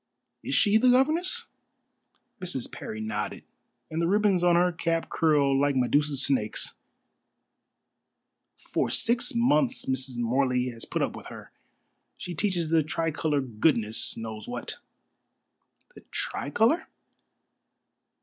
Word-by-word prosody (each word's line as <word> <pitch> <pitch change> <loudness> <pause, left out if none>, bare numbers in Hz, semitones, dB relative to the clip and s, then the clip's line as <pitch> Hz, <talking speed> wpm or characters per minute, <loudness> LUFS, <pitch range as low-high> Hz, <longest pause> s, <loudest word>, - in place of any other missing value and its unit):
"Is - - -2
she 205 +1 +4
the 250 +3 +4
governess?" 330 - +2 1.0
Mrs. 170 -9 -3
Parry 110 - -7
nodded, 105 -1 -4 0.5
and 160 +1 -1
the 170 - +1
ribbons 200 -2 +2
on 175 -1 +5
her 180 +1 +3
cap 165 0 -2
curled 145 -4 +3
like 145 0 +2
Medusa's 140 +2 +1
snakes. 110 -6 0 1.8
"For - - -2
six 235 0 +1
months 245 +2 +2
Mrs. 130 -1 -3
Morley 125 +1 +1
has 115 -2 -7
put - - -1
up - - -2
with - - -10
her. - - -11 0.7
She 180 - -6
teaches 175 -2 -1
the 165 0 +4
Tricolor 155 -1 -1
goodness 115 -2 +1
knows 110 -2 -6
what." - - -6 1.2
"The - - -14
Tricolor?" 225 - 0
155 Hz, 120 wpm, -27 LUFS, 125-190 Hz, 1.8 s, on